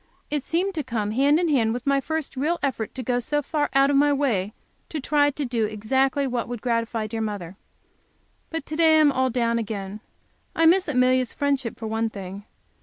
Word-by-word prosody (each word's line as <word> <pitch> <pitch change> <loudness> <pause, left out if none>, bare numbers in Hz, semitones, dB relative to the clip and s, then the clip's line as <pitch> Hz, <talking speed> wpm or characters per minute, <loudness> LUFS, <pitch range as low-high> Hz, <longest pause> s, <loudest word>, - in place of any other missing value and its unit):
It 295 -1 0
seemed 360 +6 -1
to 310 -4 -3
come 220 -5 -2
hand 280 +7 +3
in 350 - +1
hand 235 -7 +2
with 245 - -6
my 275 -1 +2
first 315 0 -3
real 305 +6 0
effort 245 -6 -2
to 260 - -5
go 245 +1 0
so 295 +4 -1
far 295 +1 -1
out 275 +1 +5
of - - +1
myself 285 0 +3
as 205 -7 0 0.4
to 315 - -4
try 290 +1 +2
to 290 0 -4
do 235 -3 0
exactly 265 +6 0
what 245 -3 -2
would 240 -1 -5
gratify 230 -1 -1
dear 225 +1 -4
mother. 200 -5 -4 0.9
But 325 -3 -4
to 310 - -5
day 320 -1 +5
I - - +6
am 295 -2 +5
all 260 -1 +1
down 235 -1 0
again. 205 -2 -5 0.6
I 330 - +3
miss 365 +3 +5
Amelia's 255 -2 +2
friendship, 275 -5 -1
for 225 - -7
one 225 +1 -1
thing. 200 -1 -8
260 Hz, 210 wpm, -24 LUFS, 225-290 Hz, 0.9 s, I